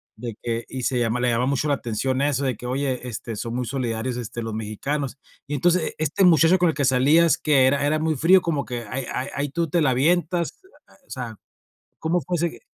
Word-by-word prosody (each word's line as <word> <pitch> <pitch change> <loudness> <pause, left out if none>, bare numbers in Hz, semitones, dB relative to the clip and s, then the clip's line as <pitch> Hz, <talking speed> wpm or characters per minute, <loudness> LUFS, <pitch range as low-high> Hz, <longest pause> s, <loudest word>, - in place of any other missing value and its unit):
de 115 0 -6
que 115 0 -3
y 130 -2 -5
se 125 - 0
llama 115 +1 0
le 125 - +1
llamaba 120 +1 +1
mucho 140 +2 0
la 145 - +2
atención 130 +2 -2
eso, 140 -1 +1
de 130 -3 0
que 125 - -10
oye, 130 0 -2
este, 115 -1 -6
son 115 +3 -4
muy 125 -1 -1
solidarios, 120 -1 -2
este, 120 0 -5
los 115 -1 -4
mexicanos. 130 +6 -3 0.3
Y 145 - -4
entonces, 175 +3 +1
este 155 +6 +1
muchacho 170 0 +6
con 175 -1 +3
el 160 - -1
que 140 -1 0
salías, 145 +6 +4
que 135 -4 +4
era 140 +1 +2
era 155 +1 +1
muy 160 -1 0
frío, 180 +7 +5
como 155 -5 -1
que 120 -2 -5
ahí 130 -1 -3
ahí 130 +2 -2
ahí 145 0 -1
tú 170 +2 -2
te 170 +2 +1
la 135 - +3
avientas, 170 - +1 0.5
o - - -33
sea, 120 -4 -6 0.6
¿cómo 170 +2 0
fue 175 +6 -2
ese? 170 +1 -2
135 Hz, 225 wpm, -23 LUFS, 125-155 Hz, 0.6 s, muchacho